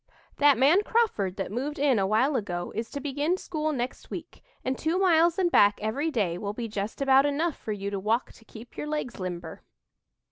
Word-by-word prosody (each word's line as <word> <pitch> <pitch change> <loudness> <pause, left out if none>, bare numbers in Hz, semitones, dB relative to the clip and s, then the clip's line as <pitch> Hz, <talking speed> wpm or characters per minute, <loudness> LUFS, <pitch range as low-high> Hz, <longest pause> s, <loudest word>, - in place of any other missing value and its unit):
"That 290 -2 +5
man 290 - +5
Crawford 415 - 0
that 195 - -4
moved 270 +7 -3
in 275 -5 +3
a 190 - +1
while 245 +8 +2
ago 175 -7 -3
is 225 +1 -4
to 285 - -5
begin 290 +5 -1
school 310 -4 -2
next 250 -3 -4
week, - - -8 0.2
and 260 - 0
two 320 +5 -1
miles 345 -3 +4
and 360 -3 +2
back 205 -7 +5
every 260 +9 -1
day 195 - -1
will 205 -1 -3
be 230 +1 -4
just 210 +4 -4
about 270 +1 +5
enough 305 +3 0
for 220 - -6
you 200 -1 -4
to 200 - -2
walk 220 +5 0
to - - -19
keep 225 +1 -13
your 295 - -5
legs 300 -7 -4
limber." 180 -2 -6
260 Hz, 210 wpm, -27 LUFS, 210-300 Hz, 0.2 s, That